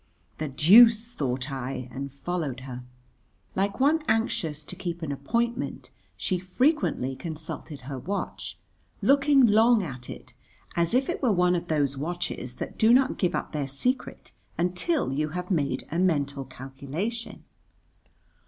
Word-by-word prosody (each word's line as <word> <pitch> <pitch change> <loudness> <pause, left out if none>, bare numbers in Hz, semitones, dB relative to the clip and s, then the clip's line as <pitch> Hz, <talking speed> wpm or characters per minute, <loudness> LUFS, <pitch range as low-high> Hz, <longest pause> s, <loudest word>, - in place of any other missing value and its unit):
"The 155 - -2
deuce!" 225 - +6
thought 130 0 -2
I, 130 -1 -4
and 140 +1 -5
followed 140 -3 -3
her. 125 -1 -7 0.7
Like 200 +4 0
one 300 +4 +4
anxious 165 - 0
to - - -6
keep 170 -1 -5
an 150 - -2
appointment, 235 - -2 0.3
she 185 -2 -1
frequently 185 - +1
consulted 155 -2 -6
her 135 +1 -6
watch, 200 +10 -4 0.5
looking 280 -1 +5
long 220 0 +5
at 125 -6 -7
it, - - -9 0.4
as 170 +5 +1
if 265 +1 +3
it 350 - -3
were 250 -5 +3
one 180 -2 +3
of 175 0 -3
those 145 -4 +1
watches 155 -6 -4
that - - -7
do 220 +1 +6
not 260 +2 +4
give 180 - +1
up - - -3
their 145 -3 -2
secret 250 - -2 0.3
until 180 - +1
you 150 +2 0
have 180 +2 -4
made 150 -6 0
a 165 - -1
mental 145 -6 +1
calculation. 140 - -5
170 Hz, 145 wpm, -27 LUFS, 140-225 Hz, 0.7 s, deuce